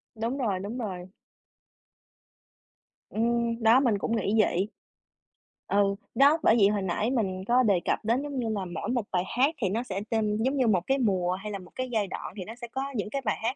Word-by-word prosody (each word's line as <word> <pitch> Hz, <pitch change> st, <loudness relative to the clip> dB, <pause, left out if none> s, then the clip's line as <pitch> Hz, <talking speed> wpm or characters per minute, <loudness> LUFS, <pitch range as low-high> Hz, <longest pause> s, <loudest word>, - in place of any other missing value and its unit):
Đúng 230 Hz, +5 st, -2 dB
rồi, 205 Hz, -8 st, 0 dB
đúng 210 Hz, +6 st, -5 dB
rồi. 185 Hz, -6 st, -4 dB, 2.0 s
Ừm, 235 Hz, +1 st, 0 dB
đó, 230 Hz, +4 st, +7 dB
mình 235 Hz, -7 st, +2 dB
cũng 230 Hz, +3 st, -1 dB
nghĩ 215 Hz, -1 st, 0 dB
vậy. 190 Hz, 0 st, +1 dB, 1.0 s
Ừ, 200 Hz, 0 st, +2 dB, 0.2 s
đó, 285 Hz, +5 st, +6 dB
bởi 220 Hz, -, +5 dB
vậy 200 Hz, -4 st, +5 dB
hồi 205 Hz, -1 st, 0 dB
nãy 200 Hz, +6 st, -1 dB
mình 190 Hz, -7 st, -1 dB
có 250 Hz, +2 st, +4 dB
đề 200 Hz, -5 st, +3 dB
cập -, -, +1 dB
đến 235 Hz, +4 st, +2 dB
giống 285 Hz, -3 st, -4 dB
như 230 Hz, -2 st, -1 dB
là 200 Hz, -3 st, -2 dB
mỗi 175 Hz, +6 st, -5 dB
một 240 Hz, -4 st, 0 dB
bài 180 Hz, -1 st, +1 dB
hát 285 Hz, +5 st, +3 dB
thì 195 Hz, -, +1 dB
nó 230 Hz, +5 st, -1 dB
sẽ 195 Hz, -4 st, -4 dB
tên 215 Hz, -2 st, 0 dB
giống 270 Hz, +2 st, +1 dB
như 250 Hz, -3 st, +3 dB
một 190 Hz, -5 st, +3 dB
cái 270 Hz, +1 st, +2 dB
mùa 190 Hz, -7 st, +1 dB
hay 210 Hz, +3 st, -5 dB
là 200 Hz, -, -4 dB
một 180 Hz, -, -14 dB
cái 255 Hz, -1 st, -3 dB
giai 210 Hz, -4 st, 0 dB
đoạn 175 Hz, -, -6 dB
thì 185 Hz, -, -4 dB
nó 225 Hz, -, -8 dB
sẽ 240 Hz, -1 st, -8 dB
có 265 Hz, +3 st, -4 dB
những 210 Hz, -1 st, -2 dB
cái 275 Hz, +3 st, -3 dB
bài 210 Hz, -, +1 dB
hát 245 Hz, +4 st, 0 dB
220 Hz, 225 wpm, -27 LUFS, 195-245 Hz, 2.0 s, đó